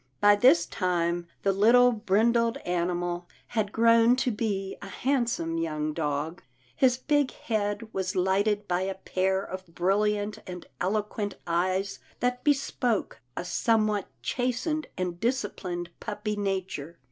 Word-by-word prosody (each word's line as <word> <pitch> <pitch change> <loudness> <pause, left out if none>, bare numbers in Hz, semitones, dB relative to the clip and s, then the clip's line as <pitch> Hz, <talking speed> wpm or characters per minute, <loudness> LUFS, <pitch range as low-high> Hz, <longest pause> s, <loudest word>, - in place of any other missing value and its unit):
By 205 0 +6
this 205 -6 +5
time, 175 -1 -1 0.2
the 195 - +3
little 240 +5 +6
brindled 230 +2 +2
animal 175 0 -1 0.2
had 215 -3 -1
grown 230 +1 +5
to 255 -1 0
be 200 -3 -2
a 200 - -7
handsome 235 -8 -1
young 155 -2 -2
dog. 150 +2 -2 0.3
His 250 - +3
big 290 0 +2
head 215 0 -3
was 185 -1 -2
lighted 205 +3 +1
by 180 0 0
a 190 0 -2
pair 190 0 0
of 185 0 -7
brilliant 205 +3 +1
and 180 -1 -7
eloquent 205 +1 -1
eyes 185 +3 0 0.2
that 250 0 -1
bespoke 270 -6 0 0.2
a - - -3
somewhat 215 -1 +1 0.2
chastened 255 +5 -1
and 180 -2 -3
disciplined 190 -7 -2
puppy 210 0 -3
nature. 190 -6 -3
205 Hz, 130 wpm, -27 LUFS, 180-230 Hz, 0.3 s, By